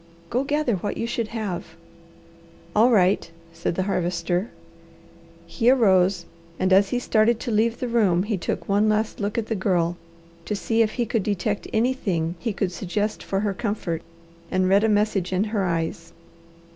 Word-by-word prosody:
Go 250 +3 +1
gather 285 -6 0
what 200 +3 -4
you - - -2
should 235 -1 -2
have." 215 -6 -5 1.0
"All 225 +4 +6
right," 190 -6 +3 0.2
said 170 - -2
the 185 - 0
Harvester. 180 +1 -1 1.0
He 225 +7 +1
arose 190 -7 +4 0.3
and 185 0 +2
as 195 +1 +5
he 245 - 0
started 225 -1 +2
to 240 - -3
leave 225 +2 +2
the 250 - -2
room 205 -7 +2
he 210 +1 -1
took 180 - -3
one 205 +2 +3
last 215 +1 0
look 205 +1 -2
at 230 - 0
the 225 - -2
Girl 180 -4 +1 0.5
to 210 - -2
see 225 +3 +1
if 215 -1 +2
he 240 - -1
could 225 0 0
detect 205 +1 -2
anything 210 -9 0
he 225 - -2
could 195 -2 -2
suggest 205 +4 -2
for 195 0 -2
her 205 -2 0
comfort, 195 -6 -3 0.5
and 185 0 +1
read 195 +2 +4
a 220 - +3
message 205 -3 +1
in 185 +2 +1
her 210 -3 -1
eyes. 165 -1 -3
205 Hz, 175 wpm, -24 LUFS, 185-225 Hz, 1.0 s, All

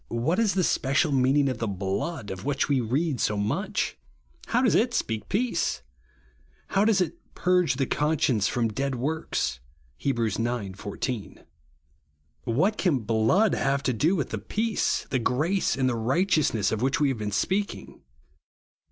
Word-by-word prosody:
What 125 - 0
is 210 -5 +2
tlie 185 - +2
special 145 +1 +1
meaning 135 +2 +3
of 130 -3 -2
the 115 - -1
BLOOD, 100 - -3
of 95 0 -6
which 145 -1 0
we 140 -3 +2
read 130 +2 -1
so 105 - +1
much? 100 -9 -1 0.5
How 245 +2 +2
does 240 - +3
it 240 +2 +2
speak 110 -3 -2
peace? 240 +4 0 0.9
How 195 - +2
does 210 -3 +3
it 175 - -2 0.2
"purge 180 -7 +2
the 135 +1 0
conscience 135 -8 +1
from 120 -2 0
dead 135 +4 -2
works" 150 - -2 0.4
(Heb. 135 -3 0
ix. 115 -4 0
14)? 115 0 -4 1.0
Whai: 135 - +2
can 175 - 0
hloocl 115 - +3
have 135 0 0
to 130 - +1
do 155 - +2
with 145 -8 -2
the 110 - -2
peace, 215 - -1
the 130 - +1
grace, 150 +9 +1
and 130 -1 +2
the 125 - +1
righteousness 125 - +1
of 110 - -2
which 130 +2 +1
we 145 -2 +3
have 130 -4 -2
been 105 -1 -3
speaking 195 - -2
135 Hz, 160 wpm, -26 LUFS, 115-170 Hz, 1.0 s, meaning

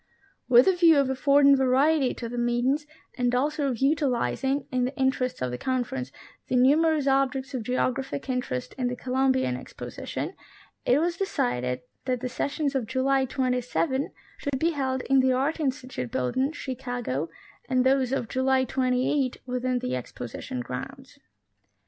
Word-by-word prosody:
With 245 0 +7
a 380 - +6
view 335 -3 +6
of 275 -2 +2
affording 280 +1 +5
variety 265 +2 +3
to 235 - -5
the 240 +1 -4
meetings, 245 +5 +1 0.3
and 245 0 +2
also 290 +2 0
of 245 - -2
utilizing, 270 0 +1
in 250 -1 +1
the 260 - -4
interests 265 - 0
of 125 - -1
the 125 - -5
Conference, 240 - -2 0.4
the - - -1
numerous 295 +4 +4
objects 270 0 +1
of 255 - -2
geographic 255 +4 -2
interest 245 - -3
in 250 - +1
the 245 - -2
Columbian 260 - +1
Exposition, 125 - -6 0.5
it 250 - +5
was 340 +1 0
de 390 - -1
cided 125 - -1 0.2
that 255 -1 0
the 255 +1 -3
sessions 285 +3 -1
of 260 -5 -1
July 265 +2 +2
27 260 +2 -1 0.3
should 285 -2 -2
be 330 +5 +1
held 265 -4 -1
in 270 0 +3
the 260 0 +3
Art 280 +6 0
Institute 260 - -3
Building, 260 - 0
Chicago, 245 - -4 0.4
and 255 0 +2
those 260 -1 +3
of 270 -4 -1
July 260 +2 +2
28 255 +1 0
within 250 0 -1
the 125 - -2
Exposition 125 0 -6
grounds. 125 +1 -8
260 Hz, 155 wpm, -26 LUFS, 245-275 Hz, 0.5 s, With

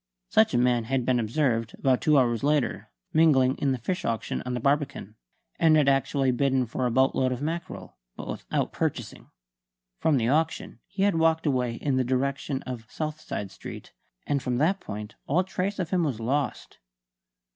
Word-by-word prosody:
Such 110 - +4
a - - +4
man 120 -1 +2
had 130 0 -1
been 125 -1 +2
observed, 115 -1 0
about 130 -2 +2
two 150 -2 +4
hours 120 -3 +2
later, 145 -2 0 0.2
mingling 140 -5 +4
in 140 - +1
a - - -5
fish 180 +10 -3
auction 115 -1 -2
on 125 - -2
the - - -2
Barbican; 140 -5 -1 0.5
and 160 -2 +5
had 150 -2 +3
actually 135 -1 +2
bidden 130 0 +1
for 125 +2 -2
a - - -1
boatload 130 +1 +2
of 125 - -3
mackerel, 170 +5 -5 0.2
but - - -8
without - - -3
purchasing. - - -3 0.7
From 155 -3 +3
the 115 -2 +1
auction 160 +5 0
he 195 - -2
had 200 -5 +2
walked 160 0 +2
away 125 -5 0
in 135 +1 -1
the 130 - +2
direction 135 +2 -1
of 120 -4 -7
Southside 155 -10 -5
Street; - - -10 0.3
and 140 -1 0
from 125 -1 -1
that 175 +8 +2
point 105 - -7
all 170 +7 +2
trace 190 +2 -3
of 180 -4 -3
him 180 -2 +2
was 135 -8 -2
lost. 135 +6 -2
135 Hz, 180 wpm, -26 LUFS, 125-155 Hz, 0.7 s, and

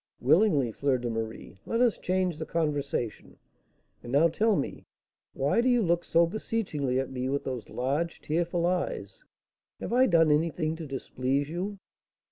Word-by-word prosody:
"Willingly, 145 - +3
Fleur 135 +3 +1
de 120 -1 -3
Marie; 110 -3 -5
let 230 - 0
us 240 -3 +3
change 185 -3 0
the 160 - -3
conversation. 145 -8 -2 0.6
And 120 - -8
now 150 +5 +5
tell 215 +6 +2
me, 140 - -4 0.5
why 145 +12 +2
do 255 - +2
you 245 -2 +3
look 170 -1 +1
so 170 +1 +4
beseechingly 165 - -2
at 135 - -3
me 130 0 -2
with 140 +1 -1
those 125 -4 -5
large, 145 +7 -2
tearful 170 +2 -1
eyes? 180 0 -2 0.6
Have - - -4
I 255 +2 +5
done 165 -3 +4
anything 160 +1 +1
to 160 -2 -7
displease 135 +1 -2
you?" 190 +5 -4
155 Hz, 160 wpm, -28 LUFS, 135-180 Hz, 0.6 s, now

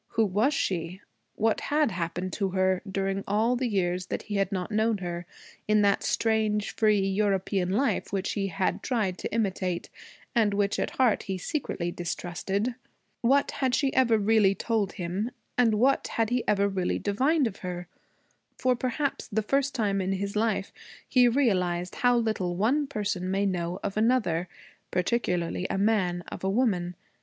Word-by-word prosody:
Who 225 -1 +3
was 210 +8 +2
she? 180 - -2 0.4
What 220 0 +1
had 295 -4 +1
happened 180 +1 -3
to 195 -2 0
her, 185 0 +1
during 195 0 -1
all 220 +5 +2
the 250 0 -1
years 180 -4 -1
that - - -3
he 205 -1 -3
had 195 0 +1
not 185 +1 -3
known 220 +1 +2
her, 175 -2 -5 0.4
in 210 0 +4
that 200 -1 +3
strange 215 -2 +1
free 215 -2 +3
European 195 -1 0
life 250 +9 0
which 195 0 -1
he 200 -2 -1
had 190 +1 -1
tried 210 -8 -1
to - - -4
imitate, 190 -5 -1 0.4
and 215 -5 +2
which 200 0 +1
at - - -3
heart 250 -5 +3
he 190 - -1
secretly 180 - -3
distrusted? 185 +6 -2 0.5
What 270 +4 +3
had 260 -2 0
she 275 -2 +1
ever 235 -4 +4
really 210 -2 +3
told 215 -4 -1
him, 185 +6 -3 0.3
and 230 -3 +3
what 260 +6 +2
had 225 0 -1
he 245 0 +1
ever 200 -1 +3
really 190 -2 -1
divined 270 +9 +2
of 210 -4 -3
her? 180 -1 -6 0.7
For 255 -1 +2
perhaps 260 +3 -2
the 220 -1 -1
first 275 +4 0
time 200 -5 +1
in 190 +1 0
his 200 +1 -3
life 215 -2 0 0.3
he 250 -2 +5
realized 185 -9 +1
how 245 -2 +4
little 215 -6 0
one 260 +10 +1
person 200 -7 -2
may 195 +1 +1
know 180 -1 -2
of 200 - -3
another, 215 -8 +1 0.4
particularly 180 -3 0
a - - -1
man 195 -4 +1
of - - -7
a 190 - +1
woman. 195 -6 +1
200 Hz, 170 wpm, -27 LUFS, 185-230 Hz, 0.7 s, he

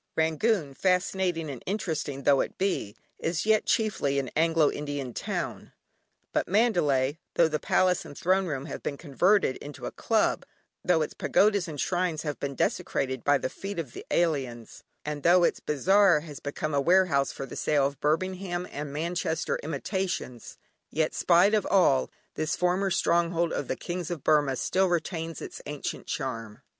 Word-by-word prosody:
Rangoon, 160 0 +1
fascinating 180 0 0
and 135 -5 -6
interesting 160 -8 -3
though 140 -1 +4
it - - -5
be, 185 - -1 0.2
is 165 +2 -1
yet 220 -1 +3
chiefly 200 -11 +1
an 135 -3 -2
Anglo 160 -1 +3
Indian 145 -4 -4
town, - - -4 0.6
but - - 0
Mandalay, 160 - +2 0.2
though 170 - +5
the 155 -1 -2
Palace 180 +3 +2
and 145 - -11
Throne 185 +2 +2
room 140 -4 -3
have 145 - -6
been 140 - -4
converted 175 +2 +2
into 145 -1 -9
a - - -4
club, - - +1 0.4
though 170 -3 +3
its - - -5
Pagodas 200 -3 +2
and 150 -3 -7
shrines 175 -2 0
have 150 -2 -4
been 140 -1 -4
desecrated 130 0 -1
by 145 0 +4
the - - -2
feet 195 +8 -7
of 150 -8 -4
the - - -8
alien, 135 -9 0 0.4
and 150 -1 -4
though 175 +3 +5
its - - +2
bazaar 180 +3 +3
has 150 -3 -9
become 145 +1 -4
a 140 - +2
warehouse 170 -4 +3
for 135 - -6
the - - -9
sale 145 -3 +2
of 140 -1 -3
Birmingham 180 +3 -1
and 145 0 -5
Manchester 160 +1 -2
imitations, 155 - -4 0.3
yet, 155 0 0
spite 180 +4 +4
of 215 - +2
all, 175 - +3 0.2
this 155 0 -1
former 180 +2 +1
stronghold 170 -1 +1
of - - -3
the - - -1
Kings 175 -2 -5
of 170 -6 -5
Burmah 145 -3 +3
still 190 +7 +1
retains 165 -2 -2
its - - -8
ancient 145 -1 -5
charm. 115 -5 -4
160 Hz, 170 wpm, -27 LUFS, 140-180 Hz, 0.6 s, though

